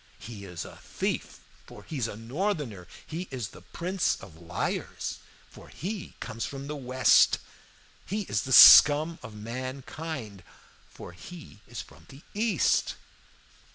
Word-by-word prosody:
He 105 -4 -9
is 90 -3 -7
a - - -12
thief, - - -4 0.3
for - - -12
he 155 - -6
is 115 - 0
a 105 - -7
Northerner! 125 - -3 0.2
He 170 +3 -6
is 125 -7 -5
the - - -14
prince 180 +1 -1
of 95 -5 -13
liars, 85 - -4 0.3
for - - -15
he 190 - -6
comes 115 -1 -5
from 140 0 -6
the 150 +1 -5
West! 130 -2 +4 0.7
He 210 +2 -2
is 110 - -1
the 130 - -6
scum 150 +5 +9
of 110 -3 -10
mankind, 130 - -6 0.5
for - - -11
he 150 - -12
is 120 - -7
from - - -19
the 135 +2 -14
East! 210 - +1
130 Hz, 145 wpm, -28 LUFS, 110-165 Hz, 0.7 s, scum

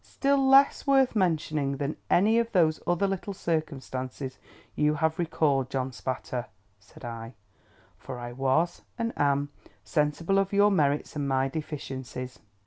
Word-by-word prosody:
"Still 280 0 +1
less 270 +2 +5
worth 270 -3 +4
mentioning 155 -7 0
than 140 +2 -2
any 220 +5 +4
of 230 0 -2
those 160 -4 +3
other 175 +3 +2
little 195 0 -3
circumstances 135 -5 -3 0.4
you 150 0 +2
have 160 +2 0
recalled, 145 -6 +1
John 130 -1 -2
Spatter," 125 0 -4 0.3
said 105 +3 -14
I; 115 0 -7 0.6
"for 130 -2 -7
I 120 0 -6
was, 135 +7 0 0.2
and 230 -1 -2
am, 145 0 +1 0.3
sensible 150 - +1
of 195 0 -1
your 205 +1 +5
merits 150 -6 +1
and 145 -1 -2
my 135 0 +1
deficiencies." 130 -4 -6
150 Hz, 140 wpm, -27 LUFS, 130-185 Hz, 0.6 s, less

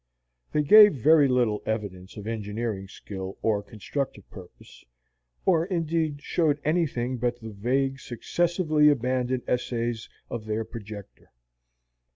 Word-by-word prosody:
They 150 - +1
gave 210 +4 +8
very 145 +3 +5
little 120 -5 +1
evidence 100 -4 -5
of 105 - -7
engineering 110 -2 -3
skill 95 0 -8
or 105 -2 +2
constructive 110 +1 -5
purpose, 95 -3 -14 0.6
or 170 -2 +3
indeed 160 -5 -1
showed 155 -4 +1
anything 140 -6 0
but 120 0 -1
the 110 -1 -8
vague, 135 +6 -1
successively 155 +4 +1
abandoned 130 -2 0
essays 120 -2 -2 0.2
of 115 -2 -6
their 110 +1 -2
projector. 105 -3 -10
120 Hz, 120 wpm, -26 LUFS, 110-150 Hz, 0.6 s, gave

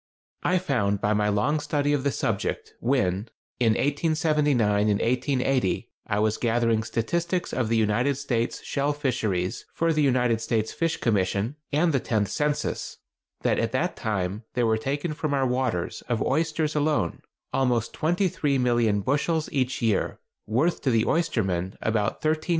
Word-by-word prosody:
I 185 - +2
found 120 - 0
by 105 +2 +1
my 105 0 +2
long 125 +10 +1
study 145 -1 0
of 140 -2 0
the 140 - +2
subject, - - -2
when, 110 -5 0 0.3
in 115 -3 +4
1879 145 -8 +2
and 100 - +2
1880, 125 -2 0 0.2
I 100 - 0
was 110 +1 +1
gathering 115 -1 +1
statistics 170 +11 -1
of 120 -4 0
the 115 - +2
United 115 +6 +2
States 120 -4 -2
shell 140 +1 0
fisheries 110 -11 -1
for 165 0 +2
the 155 - +1
United 125 -5 +2
States 110 -1 -1
Fish 165 -1 0
Commission 100 +3 0 0.2
and 155 +3 +2
the 135 - +3
Tenth 105 -4 0
Census, 150 -1 -2 0.5
that - - +2
at - - -1
that - - 0
time 100 -1 -2
there 120 -1 +2
were 110 -1 +2
taken 145 +7 -2
from 150 -1 -1
our 135 -1 +2
waters, 125 -8 -1
of 120 -2 +1
oysters 155 +1 0
alone, 150 - 0 0.3
almost 120 -4 +1
23,000,000 135 - +1
bushels 155 +3 0
each 130 -2 -1
year, 110 -4 0 0.3
worth 135 +11 +1
to 135 - +1
the 115 -3 +3
oystermen 95 - 0
about 110 +4 -1
$13,500,000. 155 0 0
125 Hz, 155 wpm, -26 LUFS, 110-150 Hz, 0.5 s, in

